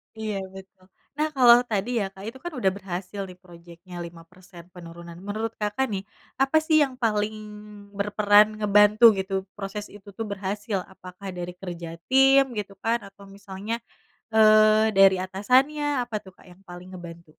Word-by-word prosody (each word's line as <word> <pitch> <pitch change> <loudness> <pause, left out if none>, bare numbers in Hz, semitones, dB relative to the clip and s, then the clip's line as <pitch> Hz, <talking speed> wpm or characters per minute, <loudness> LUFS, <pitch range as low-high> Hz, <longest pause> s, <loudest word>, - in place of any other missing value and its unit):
Iya 220 -1 -4 0.2
betul, 190 0 -14 0.3
nah 305 +1 +1
kalau 240 -2 +7
tadi 205 +3 -1
ya 200 - -1
Kak 195 0 -12
itu 265 - -12
kan 345 -2 -6
udah 190 -4 +2
berhasil 190 +1 -6
nih 180 0 -13
projectnya 175 0 -14
5% 170 +1 -14
penurunan 170 -1 -11
menurut 220 +2 -3
Kakak 210 +6 -1
nih, 195 0 -3 0.4
apa 270 +4 +3
sih 315 -1 +3
yang 265 -2 -3
paling 210 -1 0 0.6
berperan 205 0 +4
ngebantu 210 +1 +3 0.2
gitu 190 0 -5 0.2
proses 205 +1 -6
itu 205 0 -16
tuh 225 - -3
berhasil? 200 +2 -3 0.2
Apakah 185 +2 -11
dari 175 0 -5
kerja 175 -3 -7 0.2
tim 270 +1 +6
gitu 200 -1 -5
kan 230 +1 +1
atau 200 0 -17
misalnya, 200 +2 -7 0.6
eee, 215 0 +5
dari 195 -1 +6
atasannya 255 +10 +1 0.2
apa 235 -2 -12
tuh 190 - -14
Kak - - -20
yang 180 +1 -18
paling 175 +1 -10
ngebantu? 170 -1 -10
200 Hz, 160 wpm, -25 LUFS, 185-220 Hz, 0.6 s, kalau